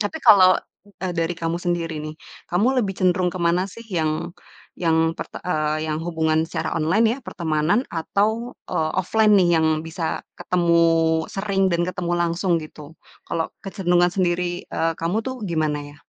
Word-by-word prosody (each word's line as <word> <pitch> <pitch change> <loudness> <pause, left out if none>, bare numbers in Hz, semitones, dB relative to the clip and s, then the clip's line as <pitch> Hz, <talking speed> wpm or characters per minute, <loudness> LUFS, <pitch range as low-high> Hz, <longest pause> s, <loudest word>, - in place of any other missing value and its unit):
Tapi 210 +9 -2
kalau, 185 -3 +8 0.4
eee, 185 -2 -2
dari 165 +1 0
kamu 165 +1 -1
sendiri 170 -2 -1
nih, 155 - -6 0.4
kamu 190 +7 +3 0.2
lebih 195 - -2
cenderung 180 -1 +2
ke 185 - -5
mana 170 +2 +2
sih 230 +4 -11
yang 165 -2 -1 0.4
yang 165 -1 +1
perte - - -8
eee, 155 -2 0
yang 155 0 -2
hubungan 160 -1 0
secara - - -3
online 165 +8 +2
ya, 265 - -5
pertemanan 170 - 0
atau, 220 +8 -1
eee, 155 0 -1
offline 210 +3 +3
nih 175 -3 +4
yang 160 - +2 0.2
bisa 165 0 -4
ketemu 170 -2 +1 0.5
sering 195 -1 0
dan 170 -1 +1
ketemu 180 -1 -3
langsung 170 +1 +1
gitu? 155 0 -9 0.3
Kalau 165 -1 -2
kecenderungan 175 -3 +1
sendiri, 175 -1 0
eee, 165 0 -1
kamu, 170 +7 -1
tuh 260 +3 -5
gimana 155 -5 0
ya? - - -17
175 Hz, 160 wpm, -22 LUFS, 160-185 Hz, 0.5 s, kalau